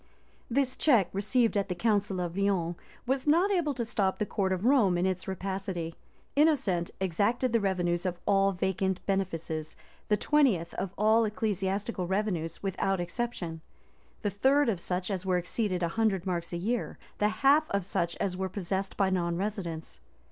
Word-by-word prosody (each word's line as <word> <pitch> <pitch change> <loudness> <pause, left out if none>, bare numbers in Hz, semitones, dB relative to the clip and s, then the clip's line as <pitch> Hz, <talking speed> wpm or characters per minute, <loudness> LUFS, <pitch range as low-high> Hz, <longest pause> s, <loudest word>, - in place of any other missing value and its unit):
This 260 +1 +1
check, 240 - +4
received 220 +4 +1
at 200 0 0
the 180 - -1
council 205 -1 +1
of 175 -1 -3
Lyons, 190 -4 +1 0.3
was 265 +2 -1
not 345 +7 +4
able 325 -7 +1
to 235 -2 -2
stop 200 -4 0
the 210 - 0
court 195 -2 -1
of 185 +3 -1
Rome 235 -9 +4
in 175 - +1
its 185 -1 -2
rapacity: 190 -3 -3 0.4
Innocent 270 - +2
exacted 205 +7 +1
the 230 - +4
revenues 175 -4 0
of 175 -1 -3
all 195 -1 +3
vacant 190 0 -1
benefices, 165 -5 -2 0.3
the 210 - +3
twentieth 225 - +2
of 190 - -3
all 220 +2 +4
ecclesiastical 205 -2 -1
revenues 190 -4 -2
without 195 0 0
exception; 175 -3 -3 0.6
the 205 - 0
third 265 +7 +3
of 195 -6 -1
such 180 +3 -2
as 190 -2 -2
were 185 -1 +1
exceeded 180 0 -1
a 170 - +1
hundred 200 -2 0
marks 175 -2 -2
a 175 - -2
year; 225 +7 -2 0.2
the 210 - +3
half 275 +8 +3
of 200 -2 -1
such 170 -2 -1
as 185 -2 -2
were 190 0 -2
possessed 190 +1 -3
by 195 -2 +2
non 170 -2 0
residents. 185 -5 -4
195 Hz, 170 wpm, -29 LUFS, 180-225 Hz, 0.6 s, check